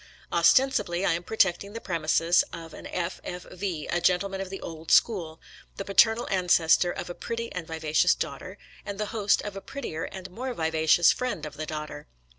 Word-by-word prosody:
Ostensibly, 180 0 +3
I - - +3
am 170 - -2
protecting 200 0 +1
the 230 - -5
premises 165 -2 +2
of 165 -1 -9
an - - -9
F. 180 0 -4
F. 180 0 -6
V. 180 -5 -4
— - - -5
a 175 - 0
gentleman 190 +2 +1
of 190 - -5
the 195 - -6
old 160 -1 -8
school, 170 -8 +3 0.4
the 195 - -4
paternal 225 +4 +4
ancestor 175 -2 +3
of - - -5
a 175 - -5
pretty 230 +5 -5
and 175 -3 -6
viva 160 -2 -5
cious - - +5
daughter, - - -6 0.3
and 200 -1 -6
the 210 - 0
host 205 -3 +2
of 205 -1 -6
a 195 - -6
prettier 180 - -5
and 185 -1 -8
more 250 +5 -5
vivacious 160 0 +4
friend 255 -8 -3
of 150 - -8
the 155 0 -5
daughter. 150 -1 -6
180 Hz, 200 wpm, -27 LUFS, 165-200 Hz, 0.4 s, cious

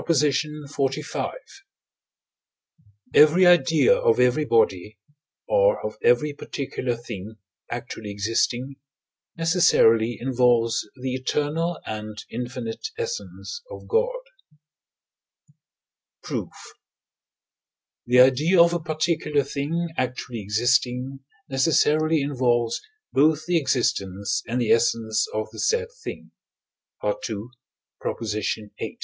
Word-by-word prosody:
XLV. 150 -1 -1 1.8
Every 155 +5 +6
idea 175 - +5
of - - +2
every 125 +5 +3
body, 105 -4 +1 0.5
or - - +3
of - - -4
every 445 - +3
particular 130 -3 -4
thing 110 -2 -8 0.3
actually 120 -3 -6
existing, 115 +6 -1 0.6
necessarily 120 - +3
involves 120 -2 +1
the 130 0 -3
eternal 150 +6 -1
and 110 0 -6
infinite 120 - -5
essence 475 0 -5
of - - -10
God. 465 +2 +2 2.1
Proof. - - -4 1.6
The 125 +1 +6
idea 145 +8 +4
of 170 0 +6
a 175 - 0
particular 155 -2 0
thing 150 +5 -3
actually 125 -2 -3
existing 125 +5 0 0.3
necessarily 155 +2 +2
involves 120 -4 0 0.3
both 155 +2 +3
the 175 -1 +2
existence 100 - -1
and 120 +2 -1
the 120 - +1
essence 115 -2 +2
of 110 0 -3
the 110 - -10
said 470 0 +1
thing - - -8 0.7
(II. 105 0 -3 1.3
viii.). - - -6
130 Hz, 95 wpm, -24 LUFS, 115-155 Hz, 2.1 s, Every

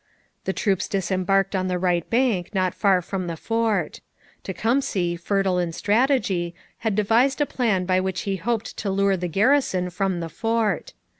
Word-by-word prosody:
The - - +1
troops 195 -1 0
disembarked 195 0 0
on 185 0 0
the 180 -1 0
right 175 -2 0
bank 225 -6 +1
not 185 -1 +1
far 190 -3 +2
from 185 0 -4
the 165 -1 -4
fort. 225 -5 -1 0.4
Tecumseh, 195 -4 0
fertile 190 +1 0
in 170 -2 -1
strategy, 205 - +1 0.2
had 220 -3 -1
devised 230 +7 +3
a 290 - +3
plan 215 -10 0
by 185 0 +2
which 185 -1 -2
he 195 -1 -2
hoped 225 +4 -2
to 200 - -2
lure 195 0 +2
the 180 -1 -3
garrison 195 - +2
from 185 0 -1
the 165 -1 -4
fort. 225 - -1
195 Hz, 165 wpm, -23 LUFS, 180-225 Hz, 0.4 s, devised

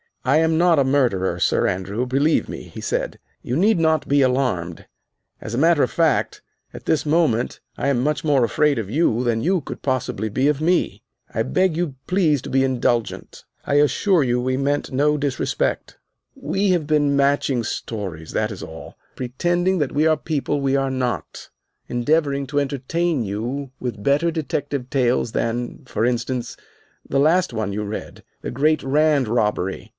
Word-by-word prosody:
"I 130 +4 +3
am 160 0 +2
not 170 -1 +4
a 140 - +4
murderer, 120 -10 +1
Sir - - +2
Andrew, 100 +6 -2
believe 140 +5 +2
me," - - -7
he - - -11
said; - - -2 0.2
"you 125 - -3
need 200 +4 +3
not 160 -2 +2
be 140 0 +3
alarmed. 125 -11 0 0.5
As 110 - -6
a - - 0
matter 165 0 +4
of - - +2
fact, 165 -2 +1 0.3
at - - -10
this 155 -1 0
moment 150 -7 +1 0.2
I - - -1
am 135 -3 +2
much 145 0 0
more 145 -5 +3
afraid 145 +5 +2
of 110 -4 -3
you 125 -3 +1
than 115 -2 0
you 180 +3 +1
could - - -8
possibly 125 -5 -2
be 130 +6 +1
of 150 0 +1
me. 175 +3 +1 0.3
I - - 0
beg 185 -3 +1
you 165 -5 -2
please 165 -7 +2
to - - -7
be 135 0 +3
indulgent. 120 -3 -1 0.2
I 140 - 0
assure 155 +5 +3
you, 125 -1 +1
we 130 +1 -1
meant 145 +2 -1
no 150 +3 +2
disrespect. 140 -3 -2 0.4
We 195 +1 -1
have 175 -4 +2
been 145 -2 +2
matching 140 -3 +2
stories, 95 -8 -5
that 110 +1 -1
is 100 - -7
all, 80 0 -10 0.2
pretending 175 +9 0
that 145 -3 0
we 150 +2 +1
are 160 -1 +3
people 145 -1 -2
we 135 0 +1
are 135 -1 0
not, 125 -2 -3 0.4
endeavoring 140 +2 +1
to 145 +1 0
entertain 145 +2 -1
you 120 +7 -4
with 115 -5 -5
better 145 +6 +2
detective 145 -5 -3
tales 125 -4 +1
than, 120 +2 -3
for 110 - -1
instance, 120 0 -2 0.5
the 135 - 0
last 160 +1 +3
one 110 -3 -2
you 105 +1 -2
read, 105 +1 -7 0.2
'The - - -4
Great 150 +5 +1
Rand 145 -1 +2
Robbery. 105 -4 -1
140 Hz, 175 wpm, -22 LUFS, 120-155 Hz, 0.5 s, not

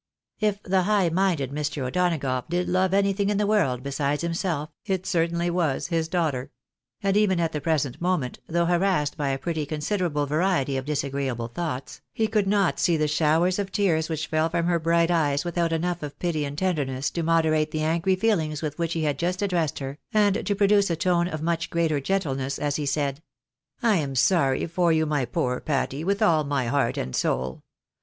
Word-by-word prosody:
" - - -66
If 210 -2 0
the 190 0 +2
high 200 -2 +2
minded 165 -6 0
Mr. 145 -2 -3
O'Donagough 140 -5 -1
did 175 +1 0
love 185 0 +2
anything 200 0 +2
in 205 - +1
the 210 - +1
world 140 - +1
besides 140 +2 -1
himself, 165 -3 -2
it 190 -2 -2
certainly 170 -1 0
was 165 -3 0
his 165 -2 0
daughter; 155 -7 -1 0.5
and 195 0 +2
even 205 -4 +3
at 165 -1 0
the 150 - -3
present 145 -5 -1
moment, 175 -8 -1
though 170 +1 +1
harassed 175 -4 +1
by 145 -3 -1
a 135 - 0
pretty 160 +1 -2
considerable 155 0 -1
variety 150 -2 +1
of 130 0 -3
disagreeable 140 -5 -2
thoughts, 140 -2 -5
he 225 - +1
could 215 -2 +1
not 200 -3 +2
see 170 -3 +2
the 155 0 +1
showers 160 +5 +2
of 195 -1 -3
tears 165 -6 +1
which 155 -1 -2
fell 155 +1 0
from 170 0 0
her 170 -1 +2
bright 170 +1 +2
eyes, 145 -3 +1
without 170 -1 0
enough 175 +2 -1
of 145 -1 -7
pity 160 -4 -1
and 140 +1 -6
tender 180 -4 +1
ness 130 +1 -3
to 170 - -2
moderate 160 -2 +2
the 155 -1 -2
angry 170 +4 +1
feelings 165 -8 0
with 150 0 -4
which 170 -1 -1
he 165 - -1
had 145 -2 -1
just 180 +3 -1
addressed 175 -6 0
her, 135 +2 -6
and 205 -4 +2
to 205 - +1
produce 200 -1 +3
a 170 - +1
tone 175 -1 +1
of 155 -3 -5
much 165 0 -1
greater 165 -3 +1
gentleness 135 -5 -1
as 145 -1 -1
he 150 -2 -3
said 140 0 -1 0.2
— 125 -1 -67
" - - -33
I 220 -4 +4
am 140 -4 -2
sorry 135 0 +2
for 170 0 +1
you, 160 0 +2
my 150 -4 0
poor 125 +1 -1
Patty, 140 0 -2
with 200 +4 +1
all 160 -7 +4
my 140 -3 -1
heart 135 +4 0
and 65 - -3
soul. 65 0 -1
165 Hz, 210 wpm, -25 LUFS, 145-180 Hz, 0.5 s, I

